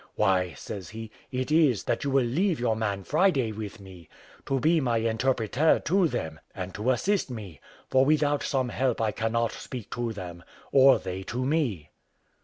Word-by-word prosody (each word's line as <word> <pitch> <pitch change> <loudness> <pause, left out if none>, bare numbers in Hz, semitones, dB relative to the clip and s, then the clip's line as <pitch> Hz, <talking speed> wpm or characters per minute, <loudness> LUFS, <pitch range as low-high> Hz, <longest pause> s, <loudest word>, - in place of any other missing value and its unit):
"Why," 95 -4 +2
says 95 +6 -7
he, 110 0 -8 0.2
"it 130 +2 -2
is, 150 - +4
that - - -1
you 140 - -1
will 135 -2 +3
leave 165 +7 +1
your 120 -2 +1
man 100 -3 -2
Friday 145 - +2
with 105 0 -7
me, 95 -4 -13 0.4
to 135 -1 +1
be 160 +3 +3
my 120 -4 +1
interpreter 115 +5 +2
to 185 +1 +2
them, 80 - -4 0.2
and 90 0 -5
to 105 +5 -2
assist 175 - +1
me; 100 - -8 0.3
for 130 0 +4
without 145 0 +2
some 130 -3 0
help 130 0 0
I 110 -1 +1
cannot 115 +1 0
speak 125 -6 -8
to 120 -1 -2
them, 90 -4 -8 0.3
or 135 0 +7
they 95 0 -5
to 125 +5 -3
me." 125 - -1
120 Hz, 180 wpm, -27 LUFS, 100-135 Hz, 0.4 s, or